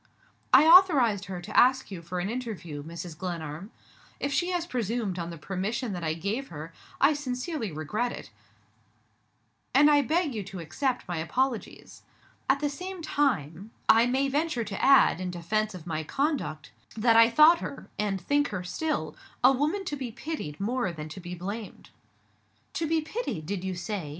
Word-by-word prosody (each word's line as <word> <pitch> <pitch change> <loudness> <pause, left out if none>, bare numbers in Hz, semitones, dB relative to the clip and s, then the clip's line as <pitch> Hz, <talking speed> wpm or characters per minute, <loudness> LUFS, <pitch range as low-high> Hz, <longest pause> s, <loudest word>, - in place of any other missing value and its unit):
"I 265 +4 +8
authorized 290 - +6
her 185 -1 -5
to 210 +3 -8
ask 260 -2 +4
you 180 -3 -6
for 180 +2 -5
an 175 - -2
interview, 205 -11 -5
Mrs. 165 +2 -7
Glenarm. 170 0 -5 0.5
If 280 0 -2
she 350 +4 +1
has 350 -2 -1
presumed 230 - -2
on 170 0 -4
the 170 - -7
permission 200 - -3
that 175 -2 -5
I 160 -1 -1
gave 210 +11 -3
her, 155 +1 -9 0.3
I 280 +3 +5
sincerely 260 - -3
regret 210 +11 -2
it, - - -9 1.4
and 295 +2 +7
I 290 -1 +5
beg 310 +1 0
you 215 - -3
to 190 - -8
accept 250 - -2
my 175 -1 -3
apologies. 245 +9 -3 0.5
At 275 +1 +3
the 295 - +1
same 365 +5 -6
time, 205 - -1 0.2
I 230 +2 +6
may 265 +2 +1
venture 290 -3 0
to 200 -2 -5
add, 270 -9 +6
in 185 - -3
defense 195 +4 -1
of 175 -3 -10
my 160 -2 -3
conduct, 250 - -2 0.3
that 225 +1 +4
I 230 0 +7
thought 305 +7 +7
her - - -7
and 200 -2 0
think 285 +10 +1
her 185 -3 -4
still 180 - -2 0.3
a 255 - +8
woman 305 +9 0
to 295 - -3
be 260 -4 -5
pitied 240 - -6
more 225 -1 -1
than 155 -2 -7
to 155 - -8
be 180 0 -7
blamed." 200 +5 -7 0.8
"To 325 - -1
be 320 0 +1
pitied 315 - -4
did 190 +1 -3
you 190 -1 -3
say?" 180 -3 -4
220 Hz, 180 wpm, -28 LUFS, 175-280 Hz, 1.4 s, I